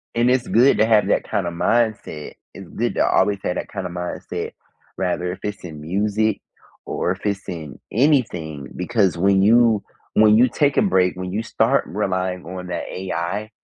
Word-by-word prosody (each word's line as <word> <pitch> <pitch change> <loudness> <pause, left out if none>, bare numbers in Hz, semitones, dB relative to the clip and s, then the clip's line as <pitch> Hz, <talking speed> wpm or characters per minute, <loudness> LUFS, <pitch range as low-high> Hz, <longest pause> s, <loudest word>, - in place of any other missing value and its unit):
And 120 +1 +3
it's 125 -1 +1
good 125 +5 +4
to 110 - +4
have 110 -2 +3
that - - +2
kind 100 -5 -2
of 85 - -4
mindset. 110 -6 -1 0.2
It's - - -10
good - - -2
to - - +2
always 100 -1 +2
have 90 - -1
that - - -4
kind 95 -2 -5
of 85 - -5
mindset. 90 0 -5 0.5
Rather 90 -1 -1
if 95 - -7
it's 105 -1 -5
in 75 -4 -8
music 105 +5 0 0.4
or 90 - -1
if 95 +3 -6
it's 100 -1 -2
in 80 -6 -7
anything. 95 - +1
Because 95 -2 +1
when 95 +1 +3
you 115 0 +4 0.3
when 105 0 +6
you 125 +2 +5
take 140 +3 +1
a - - +4
break, 90 - +2
when 90 0 -5
you 105 +3 -1
start - - +1
relying 95 -2 -2
on 90 +1 -7
that 90 - -3
AI, 95 +3 -3
100 Hz, 190 wpm, -21 LUFS, 90-110 Hz, 0.5 s, when